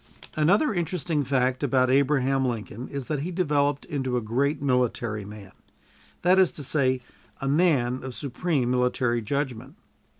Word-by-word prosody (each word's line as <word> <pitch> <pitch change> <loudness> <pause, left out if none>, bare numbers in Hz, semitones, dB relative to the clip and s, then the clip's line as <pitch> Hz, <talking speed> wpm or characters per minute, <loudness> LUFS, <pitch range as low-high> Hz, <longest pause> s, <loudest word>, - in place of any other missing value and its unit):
Another 195 - +3
interesting 170 -3 -1
fact 130 -1 0
about 130 -2 +2
Abraham 135 -1 +2
Lincoln 120 -1 -4
is 140 -2 -5
that 150 +1 -2
he 155 +6 -3
developed 145 -5 0
into 130 -4 -2
a - - +2
great 135 +7 0
military 120 -5 0
man; 100 -2 -11 0.7
that 185 +2 +5
is 185 -3 +4
to 145 - -7
say, 130 -2 +1 0.4
a 135 - -3
man 135 -5 +2
of 130 -2 -6
supreme 140 -2 -1
military 125 -1 +1
judgment. 130 +1 -3
135 Hz, 145 wpm, -26 LUFS, 125-150 Hz, 0.7 s, that